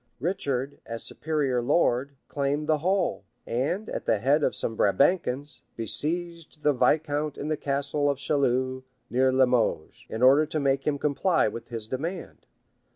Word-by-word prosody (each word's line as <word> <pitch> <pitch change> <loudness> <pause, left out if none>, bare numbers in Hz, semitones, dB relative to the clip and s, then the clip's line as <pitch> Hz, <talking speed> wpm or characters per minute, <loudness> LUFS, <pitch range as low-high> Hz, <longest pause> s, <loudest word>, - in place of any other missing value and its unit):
Richard, 140 -5 -2
as 115 0 -6
superior 145 -6 -1
lord, 140 0 +1
claimed 145 +1 -1
the 155 -1 +2
whole; 185 - 0 0.2
and, 150 - -1
at - - -5
the - - +3
head 140 +8 +2
of 130 - +1
some 115 - -3
Brabançons, 140 - +1
besieged 165 - -3
the 150 - +4
viscount 150 +2 +1
in 150 - -4
the 155 - +1
castle 145 +1 -1
of 140 - 0
Chalus, 130 -2 0 0.3
near 130 +1 +3
Limoges, 125 -11 +1
in 110 +3 -3
order 140 +4 +6
to 155 - -2
make 135 0 0
him 145 -1 +1
comply 150 +5 +2
with 115 +2 -6
his 115 -2 -6
demand. 165 +9 -5
140 Hz, 155 wpm, -26 LUFS, 130-155 Hz, 0.3 s, order